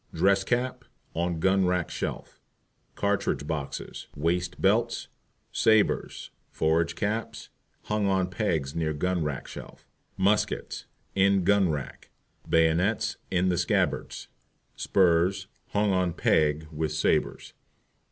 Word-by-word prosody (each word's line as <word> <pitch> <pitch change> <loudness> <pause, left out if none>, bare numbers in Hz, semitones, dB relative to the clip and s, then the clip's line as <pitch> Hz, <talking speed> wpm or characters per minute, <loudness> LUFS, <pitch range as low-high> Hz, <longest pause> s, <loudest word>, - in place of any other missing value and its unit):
Dress 100 0 +3
Cap 125 +4 -1 0.3
On 85 0 -1
gun 95 +2 +3
rack 90 -2 0
shelf. - - -5 0.5
Cartridge 100 -7 0
Boxes, 75 -3 -5
Waist 85 +4 -1
Belts, 115 +4 +1 0.4
Sabres, 110 -2 +1 0.2
Forage 80 +1 +1
Caps 110 +2 -3 0.3
Hung 105 -1 0
on 95 -1 +1
pegs 80 -10 -1
near 80 -2 -1
gun 90 +3 -1
rack 75 -3 -4
shelf. - - -11 0.3
Muskets 100 +3 0 0.3
In 100 -1 +3
gun 100 -1 +3
rack, 75 -4 -5 0.4
Bayonets 80 +6 +2
in 90 0 +1
the 90 -1 +1
scabbards. 90 - -1 0.5
Spurs 95 +1 +2 0.2
Hung 105 0 +1
on 90 -2 +1
peg 75 -2 +2
with 80 0 -2
Sabres. 75 +1 0
90 Hz, 115 wpm, -27 LUFS, 80-100 Hz, 0.5 s, Dress